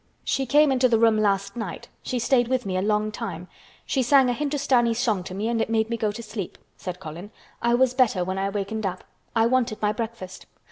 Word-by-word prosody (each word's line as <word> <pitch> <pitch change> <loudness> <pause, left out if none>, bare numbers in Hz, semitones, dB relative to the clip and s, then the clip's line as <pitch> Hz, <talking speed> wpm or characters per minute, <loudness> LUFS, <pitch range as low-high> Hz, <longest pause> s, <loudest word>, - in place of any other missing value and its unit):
"She 270 -1 -1
came 295 +2 +5
into 255 -1 +3
the 230 - +4
room 225 -1 +4
last 200 -1 0
night. 225 -7 -6
She 255 - -3
stayed 245 0 +2
with 255 -1 0
me 190 -1 -2
a 185 - +1
long 210 +1 +1
time. 180 -4 -6 0.4
She 270 - 0
sang 260 0 +5
a - - 0
Hindustani 270 -4 +1
song 220 -6 0
to 185 - -7
me 205 +3 -2
and 230 -1 0
it - - -1
made 225 0 +1
me - - +1
go 215 -2 0
to 235 +3 -8
sleep," 215 -4 -6 0.2
said 180 -1 -6
Colin. 175 +3 -8 0.3
"I 235 0 +3
was 255 0 +3
better 245 -8 +2
when 185 +1 -3
I 195 0 0
wakened 205 +1 -2
up. 185 0 -5 0.3
I 225 0 +4
wanted 240 -2 +1
my 210 -1 +1
breakfast. 215 -4 -6
225 Hz, 230 wpm, -25 LUFS, 200-245 Hz, 0.4 s, came